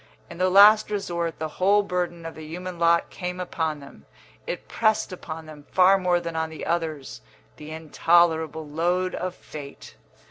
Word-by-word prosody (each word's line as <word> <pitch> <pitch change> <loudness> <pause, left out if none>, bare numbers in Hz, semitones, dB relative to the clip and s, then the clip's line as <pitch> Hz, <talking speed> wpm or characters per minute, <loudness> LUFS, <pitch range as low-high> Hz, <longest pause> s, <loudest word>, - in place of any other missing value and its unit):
In 170 - -10
the 185 0 +3
last 210 +3 +7
resort 170 -5 -3
the 160 - -3
whole 205 +2 +4
burden 175 -3 -3
of 165 - -6
the 155 - -10
human 175 +3 -7
lot 170 0 +3
came 180 0 -5
upon 160 -4 -3
them; 140 - -15 0.4
it - - -5
pressed 220 -3 +1
upon 160 -2 -8
them 150 -2 -13
far 190 +1 +5
more 180 -1 +2
than 170 -1 -6
on 160 0 -1
the 160 - -8
others, 160 -5 -3 0.4
the 150 0 -10
intolerable 160 0 +1
load 175 +4 0
of 185 0 -4
fate. 145 -2 -11
170 Hz, 170 wpm, -25 LUFS, 160-185 Hz, 0.4 s, last